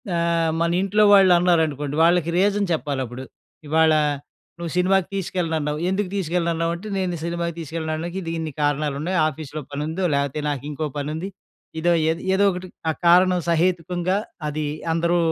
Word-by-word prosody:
ఆహ్, 170 -1 +1
మనింట్లో 190 +5 +2
వాళ్ళన్నారనుకోండి, 170 -6 +3
వాళ్ళకి 170 0 +3
రీజన్ 205 +1 +2
చెప్పాలప్పుడు. 130 -4 -4 0.4
ఇవాళ 160 +1 +4 0.6
నువ్వు 170 -1 -5
సినిమాకి 185 0 +2
తీసుకెళ్ళనన్నావు, 165 -5 -2
ఎందుకు 190 0 -1
తీసుకెళ్ళనన్నావంటే, 170 +1 -1
నేను 185 -2 -1
సినిమాకి 170 0 -2
తీసుకెళ్ళడానికి 160 +2 -4
ఇది 165 -2 -4
ఇన్ని 160 -1 -4
కారణాలున్నాయి. 145 +4 0
ఆఫీస్‌లో 155 0 -6
పనుందో, 155 +6 -3
లేపోతే 140 +1 -1
నాకింకో 145 +2 -3
పనుంది. 155 +6 -3 0.5
ఇదో, 175 +1 +3 0.2
ఏద్ 165 +1 -1
ఏదోకటి, 190 -2 +1 0.2
ఆ - - -3
కారణం 180 +1 +5
సహేతుకుంగా, 175 +2 +1 0.3
అది 150 +1 -3 0.3
అందరూ 170 +1 +1
170 Hz, 120 wpm, -22 LUFS, 155-180 Hz, 0.6 s, కారణం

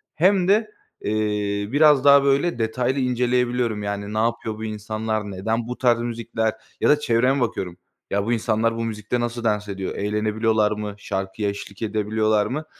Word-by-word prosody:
hem 185 +2 +3
de, 215 +2 +3 0.3
eee, 105 -1 -1
biraz 145 -2 +5
daha, 140 -1 +7
böyle, 140 0 +1
detaylı 125 +4 0
inceleyebiliyorum, 125 -3 0
yani, 100 0 -4
"Ne - - -3
yapıyor 115 -1 -1
bu 110 - -7
insanlar, 110 0 -3
neden 110 +5 -2
bu 125 - -5
tarz 120 -2 +3
müzikler?" 115 -1 -2 0.3
ya - - +3
da 150 0 +5
çevreme 130 +1 +2
bakıyorum. 90 -6 -2 0.3
"Ya, 100 0 0
bu 120 - +1
insanlar 115 0 +1
bu 115 - -2
müzikte 110 +2 -3
nasıl 120 0 -3
dans 105 -2 0
ediyor, 95 -1 -4
eğlenebiliyorlar 105 +1 +1
mı, 105 -1 -4
şarkıya 95 +1 -3
eşlik 100 0 -8
edebiliyorlar 110 0 +1
mı?" 155 +4 -3
110 Hz, 165 wpm, -23 LUFS, 105-125 Hz, 0.3 s, daha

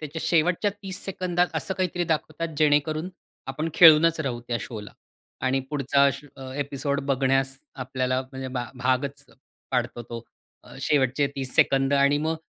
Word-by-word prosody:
त्याच्या 155 +1 -6
शेवटच्या 175 +5 +2
30 190 -1 -5
सेकंदात 180 -2 0
असं 160 +5 -1
काहीतरी 180 -2 -1
दाखवतात, 160 +1 -1
जेणेकरून 155 +2 +2 0.4
आपण 150 +5 -3
खिळूनच 165 0 +7
राहू 125 -5 -3
त्या 120 - 0
शोला. 105 -1 -7 0.5
आणि 130 +1 +1
पुढचा 140 -1 +2 0.3
अ, 130 -1 -8
एपिसोड 140 0 -2
बघण्यास 135 0 +1 0.3
आपल्याला 130 0 -1
म्हणजे 130 0 -7
भा 120 - -3
भागच 130 +3 -1 0.5
पाडतो 120 -2 -1
तो 115 0 -8 0.4
अ, - - -14
शेवटचे 140 0 +2
30 130 -2 -4
सेकंद 135 0 +3
आणि 140 +1 +4
मग 160 +2 -1
140 Hz, 145 wpm, -25 LUFS, 130-160 Hz, 0.5 s, खिळूनच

